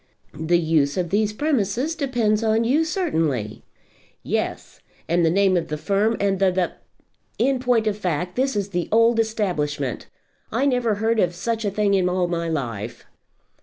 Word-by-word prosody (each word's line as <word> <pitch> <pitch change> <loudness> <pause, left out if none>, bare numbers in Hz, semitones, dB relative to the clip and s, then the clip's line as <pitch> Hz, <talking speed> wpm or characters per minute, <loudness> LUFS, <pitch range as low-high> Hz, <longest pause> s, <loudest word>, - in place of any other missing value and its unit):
"The 160 +3 +1
use 155 -3 +1
of 175 -2 -1
these 210 +1 +2
premises 255 - 0
depends 240 -8 0
on 220 +1 +2
you 285 +8 +2
certainly." 160 - -1 0.6
"Yes; - - -3 0.3
and 170 +1 +2
the 165 - +4
name 190 +2 +3
of 170 - 0
the 150 - -3
firm, 205 +7 +1
and 195 -1 +1
the 195 - +3
the 180 -1 0 0.6
the. - - +2
In 270 -1 +1
point 245 -3 +2
of 210 -2 0
fact, 180 -1 -2
this 265 -1 0
is 200 -1 -1
the 175 -3 -2
old 230 +1 +4
establishment. 175 - -1 0.4
I 240 +5 +1
never 245 -5 +1
heard 220 +2 0
of 175 -3 +1
such 225 +4 -2
a - - +2
thing 205 0 +1
in 185 -2 +2
all 180 0 0
my 170 -1 -2
life." 120 -6 -4
200 Hz, 175 wpm, -23 LUFS, 170-230 Hz, 0.6 s, the